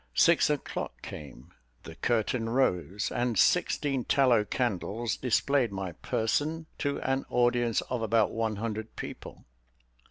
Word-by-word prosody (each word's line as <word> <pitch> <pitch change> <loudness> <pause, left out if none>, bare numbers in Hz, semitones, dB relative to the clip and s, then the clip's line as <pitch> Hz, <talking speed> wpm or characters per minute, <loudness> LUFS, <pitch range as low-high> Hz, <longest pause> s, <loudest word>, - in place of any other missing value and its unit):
Six 170 -2 +5
o'clock 150 -2 -3
came, 75 +2 -10 0.3
the 80 - -9
curtain 115 +3 0
rose, 105 -5 0
and 120 -2 0
sixteen 135 +4 +2
tallow 125 -6 +4
candles 115 0 -2
displayed 130 0 +1
my 95 -2 -4
person 145 - -1
to 145 -1 -1
an 135 0 0
audience 120 -1 +2
of 125 -2 -4
about 110 -1 +2
one 110 -1 -1
hundred 110 +1 -4
people. - - -8
115 Hz, 125 wpm, -29 LUFS, 105-130 Hz, 0.3 s, Six